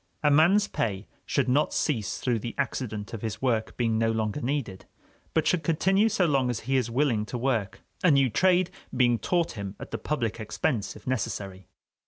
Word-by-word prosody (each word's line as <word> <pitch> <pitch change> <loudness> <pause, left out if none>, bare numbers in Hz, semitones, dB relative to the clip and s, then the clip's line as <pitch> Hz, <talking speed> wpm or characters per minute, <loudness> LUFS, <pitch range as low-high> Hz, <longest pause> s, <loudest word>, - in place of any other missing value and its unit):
A 150 - +4
man's 180 +8 +5
pay 100 - -2 0.2
should 140 - +1
not 140 +4 +2
cease 115 - -1
through 120 -3 0
the 115 +2 -6
accident 115 -6 -3
of 110 - -5
his 110 -4 -4
work 115 -4 -1
being 115 -2 +1
no 115 0 +2
longer 110 +4 -1
needed, 125 -8 -3 0.5
but 160 - +2
should 180 - +2
continue 190 +7 +2
so 195 -4 +2
long 135 -5 +2
as 120 - -2
he 135 +4 -1
is 125 -3 +1
willing 120 -3 +1
to 125 - -4
work, 115 -6 -1 0.2
a 180 - +6
new 140 -3 +5
trade 180 - +2 0.3
being 120 -2 +3
taught 175 -2 0
him 100 -3 -6
at - - -9
the - - -3
public 120 -7 -2
expense, 110 0 -2
if - - -14
necessary. 100 -6 -3
125 Hz, 195 wpm, -27 LUFS, 110-150 Hz, 0.5 s, a